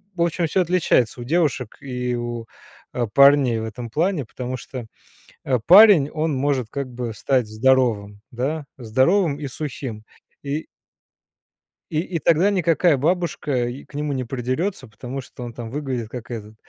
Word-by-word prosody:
В 170 - -3
общем, 170 0 0
всё 185 - +1
отличается 155 -9 +1
у - - -4
девушек 145 -5 0
и 125 -2 -3
у, 120 -1 -4 0.5
э, 120 -2 -1
парней 140 -4 +6
в 110 - -4
этом 115 +2 -7
плане. 165 - 0
Потому 125 +3 -5
что, 125 0 -8 0.6
э, 130 - +2
парень, 190 -6 +8
он 155 -1 -1
может 130 -3 0
как 140 0 -4
бы 120 -2 -4
стать 125 0 0
здоровым, 110 -3 +1
да, 140 +5 -2
здоровым 140 - +2
и 145 - -4
сухим. 130 -5 -6 0.4
И 145 +2 -3 1.3
и 155 - 0
и 170 -1 -3
тогда 170 +7 +3
никакая 170 -3 +3
бабушка 145 -5 0 0.2
к - - -22
нему 145 0 -2
не 130 -1 -2
придерется. 130 - -3
Потому 125 +5 -7
что 125 - -11
он 120 -1 -7
там 115 -1 -7
выглядит 130 -4 -3
как 120 0 -8
этот, 110 -2 -7
130 Hz, 160 wpm, -22 LUFS, 120-155 Hz, 1.3 s, парень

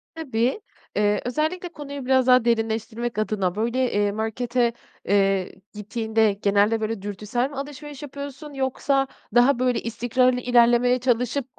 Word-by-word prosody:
Tabii. 260 - -1 0.4
Iıı, 205 0 +2
özellikle 315 +8 -2
konuyu 285 -4 -8
biraz 260 0 +3
daha 250 -2 +5
derinleştirmek 225 0 -1
adına, 205 -4 -1
böyle, 235 +4 0
eee, 205 0 +2
markete, 235 +3 -1 0.3
eee, 195 -1 +2 0.2
gittiğinde 220 0 0
genelde, 205 +2 +2
böyle, 215 -1 -3
dürtüsel 210 +6 -2
mi 285 - -10
alışveriş 290 +1 -7
yapıyorsun, 285 +1 -8
yoksa 270 +1 0 0.3
daha 245 +1 +5
böyle, 250 -1 +1
istikrarlı 245 +2 +1
ilerlemeye 245 0 +4
çalışıp, 250 +1 0
240 Hz, 130 wpm, -24 LUFS, 220-265 Hz, 0.4 s, daha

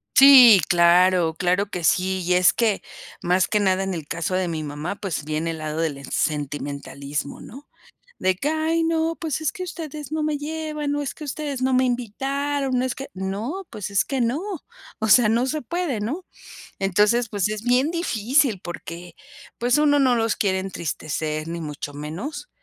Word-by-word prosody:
Sí, 255 -8 +9
claro, 175 -1 +4
claro 180 +4 +1
que 180 -4 -5
sí, 185 +3 +2
y 180 +1 +1
es 180 0 +5
que, 225 -4 +1 0.4
más 180 +1 +2
que 210 - +1
nada 190 -1 +2
en 190 -1 -2
el 160 -4 -6
caso 170 +3 -2
de 185 -1 0
mi 160 -2 -3
mamá, 150 +6 -4
pues, 180 -8 -4
viene 155 +2 -2
el 160 - -6
lado 155 0 -4
del 160 -4 -1
es 140 -1 -9
sentimentalismo, 140 -1 -3
¿no?, 275 +4 -12 0.5
de 185 0 +2
que: 280 +11 -2
"Ay, 315 +1 0
no 325 0 +1
pues, 320 -2 -2
es 290 -4 -1
que 365 - -7
ustedes 310 -5 -7
no 315 - -1
me 300 -1 0
llevan, 300 -1 -3
o 290 - -1
es 275 - -4
que 305 - -9
ustedes 285 -2 -4
no 260 - +1
me 255 +1 +4
invitaron, 270 +3 -1
o - - 0
es 260 - -2
que", 270 - -7
"No, 215 - -4
pues, 210 -1 -6
es 200 - +2
que 270 -3 -2
no". 240 +7 0 0.6
O 220 - -1
sea, 215 +2 +6
no 235 +4 +2
se 305 +2 -2
puede, 330 -4 -2
¿no? 295 - -3 0.6
Entonces, 210 +5 +2
pues, 205 -1 0
es 215 0 -4
bien 250 +5 +2
difícil 260 - +1
porque, 175 0 -8 0.4
pues, 245 +4 +2
uno 290 -1 +4
no 255 -3 +4
los 225 -1 +1
quiere 190 -2 0
entristecer 155 -4 -4
ni 170 +1 -4
mucho 145 -2 -6
menos, 180 - -6
215 Hz, 190 wpm, -23 LUFS, 175-280 Hz, 0.6 s, Sí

